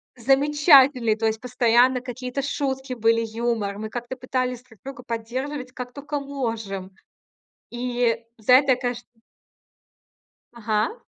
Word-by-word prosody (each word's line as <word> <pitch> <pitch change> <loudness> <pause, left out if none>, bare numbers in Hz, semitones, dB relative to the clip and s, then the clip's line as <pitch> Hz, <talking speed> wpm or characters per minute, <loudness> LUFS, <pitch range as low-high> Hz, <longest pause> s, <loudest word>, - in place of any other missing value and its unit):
замечательные. 270 -2 +4
То 225 - -2
есть 220 0 0
постоянно 250 +1 +3
какие-то 255 +1 -5
шутки 265 -2 -3
были, 230 -1 +2
юмор. 220 -3 -2
Мы 215 0 -5
как-то 240 +2 -5
пытались 255 -1 -3
друг 225 -5 -21
друга 265 -2 -8
поддерживать, 255 +4 -5
как 250 -1 -7
тока 290 0 -4
можем. 225 -9 -4 0.8
И 240 -1 -1 0.2
за 220 +3 +2
это, 265 +1 +6
я - - +2
кэшн 245 -1 -4 1.5
Ага. 220 - -1
250 Hz, 125 wpm, -24 LUFS, 230-265 Hz, 1.5 s, это